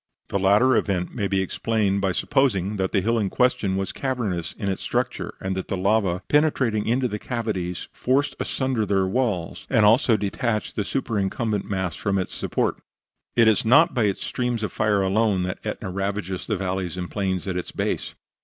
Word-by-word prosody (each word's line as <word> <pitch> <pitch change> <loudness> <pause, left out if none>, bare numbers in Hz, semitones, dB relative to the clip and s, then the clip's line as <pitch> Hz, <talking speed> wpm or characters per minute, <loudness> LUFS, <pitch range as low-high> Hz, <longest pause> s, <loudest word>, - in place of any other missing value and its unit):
The 100 - 0
latter 105 +7 +4
event 95 -5 0
may 100 -5 -1
be 95 -1 +1
explained 100 0 0
by 95 -1 +1
supposing 105 -4 +1
that 95 -1 -1
the 100 - +2
hill 115 +4 +1
in 100 -3 0
question 110 -6 +1
was 95 0 -2
cavernous 110 -11 -2
in 100 - -5
its 95 -1 -2
structure, - - -2
and 95 0 -2
that 95 - -4
the 95 - -2
lava, 95 -2 +1
penetrating 130 -8 +2
into 125 +3 +2
the 105 -2 -4
cavities, 105 -8 -3
forced 135 +3 +1
asunder 130 -4 -1
their 100 -2 +1
walls, 95 -5 -1
and 115 -5 +4 0.2
so 115 -7 +3
detached 105 +2 -2
the 105 - 0
superincumbent 105 -2 -1
mass 95 -4 -2
from 100 -1 -1
its 95 - -2
supports. - - -1 0.5
It 115 -2 +5
is 110 -2 +4
not 145 +9 +5
by 120 -4 +2
its 100 -2 -1
streams 125 -3 -2
of 110 - -2
fire 105 -2 +1
alone 100 -1 +2
that 90 0 -3
Etna 95 - -4
ravages 95 -1 -3
the 105 - 0
valleys 95 -1 -3
and 90 -1 -5
plains 95 -3 -1
at 95 -2 -3
its 90 - -3
base. - - -2
100 Hz, 190 wpm, -24 LUFS, 95-115 Hz, 0.5 s, It